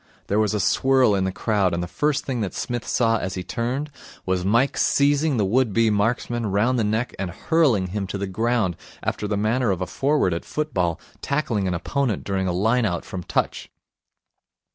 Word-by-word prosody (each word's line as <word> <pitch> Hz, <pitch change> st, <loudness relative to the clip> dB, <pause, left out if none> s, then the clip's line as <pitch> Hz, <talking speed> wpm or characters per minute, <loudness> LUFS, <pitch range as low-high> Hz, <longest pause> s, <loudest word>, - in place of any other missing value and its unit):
There 105 Hz, -, +1 dB
was 110 Hz, -1 st, +1 dB
a -, -, 0 dB
swirl 130 Hz, +3 st, +3 dB
in 95 Hz, -1 st, +1 dB
the 95 Hz, -, 0 dB
crowd, 100 Hz, -3 st, 0 dB
and 85 Hz, -, -2 dB
the -, -, -4 dB
first 150 Hz, -, 0 dB
thing 125 Hz, -4 st, -2 dB
that 100 Hz, -, -3 dB
Psmith 120 Hz, -2 st, -3 dB
saw 115 Hz, -2 st, +2 dB
as 95 Hz, +1 st, -4 dB
he 90 Hz, -, -4 dB
turned 125 Hz, +10 st, -3 dB, 0.3 s
was 95 Hz, -1 st, 0 dB
Mike 120 Hz, +8 st, +2 dB
seizing 145 Hz, 0 st, +2 dB
the 105 Hz, -, +2 dB
would 115 Hz, +2 st, +2 dB
be 115 Hz, 0 st, +3 dB
marksman 115 Hz, +2 st, 0 dB
round 110 Hz, +6 st, +1 dB
the -, -, +2 dB
neck 110 Hz, +4 st, -1 dB
and 95 Hz, -2 st, -2 dB
hurling 115 Hz, -, +1 dB
him 100 Hz, +1 st, -3 dB
to 100 Hz, -, -4 dB
the 100 Hz, -, -2 dB
ground, 105 Hz, -2 st, 0 dB, 0.3 s
after 105 Hz, -, -2 dB
the 105 Hz, 0 st, -1 dB
manner 115 Hz, +3 st, +1 dB
of 95 Hz, -3 st, 0 dB
a 90 Hz, -, -1 dB
forward 135 Hz, -, +1 dB
at 85 Hz, -, -3 dB
football 95 Hz, -, -1 dB, 0.2 s
tackling 120 Hz, -9 st, -1 dB
an 90 Hz, -, 0 dB
opponent 125 Hz, -, -1 dB
during 95 Hz, -1 st, -1 dB
a -, -, +1 dB
line 110 Hz, +7 st, +2 dB
out 90 Hz, -4 st, -2 dB
from 95 Hz, -, -6 dB
touch. -, -, -2 dB
110 Hz, 205 wpm, -23 LUFS, 95-125 Hz, 0.3 s, swirl